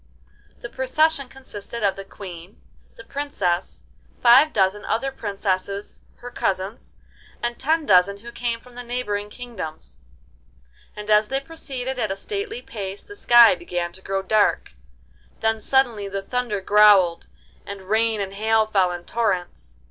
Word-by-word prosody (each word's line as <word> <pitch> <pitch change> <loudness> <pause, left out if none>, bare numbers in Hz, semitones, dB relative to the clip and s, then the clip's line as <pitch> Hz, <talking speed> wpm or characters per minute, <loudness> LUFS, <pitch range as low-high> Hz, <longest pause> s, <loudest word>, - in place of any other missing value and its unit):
The - - -5
procession 275 +1 +1
consisted 235 -4 -8
of 195 -2 +2
the 195 - -7
Queen, 185 -1 -11 0.4
the 230 - -12
Princess, 205 -10 -2 0.4
five 260 +6 +6
dozen 195 0 +1
other 270 +5 -1
princesses 200 -3 -3
her 245 0 -10
cousins, 195 +1 -3 0.5
and 240 0 -2
ten 315 +2 +1
dozen 185 0 +4
who 235 +1 -9
came 235 -1 -2
from 250 +1 -18
the 245 - -7
neighbouring 235 -4 -3
kingdoms; 160 - -8 1.0
and 210 0 -8
as 210 0 +5
they 270 +3 -1
proceeded 265 -4 -5
at 215 -4 -1
a - - -1
stately 415 - -5
pace 200 -2 -6
the 410 - -12
sky 240 - +7
began 175 0 -4
to 190 - -15
grow 195 0 -2
dark, 210 +2 +2 0.7
then 220 0 0
suddenly 240 -5 +1
the 195 0 -4
thunder 240 -3 -2
growled, 200 -4 +5 0.4
and 200 -1 -8
rain 220 +1 +1
and 195 -1 -3
hail 220 +2 +2
fell 195 -4 +2
in 175 0 -7
torrents. 180 - -2
210 Hz, 150 wpm, -23 LUFS, 195-245 Hz, 1.0 s, sky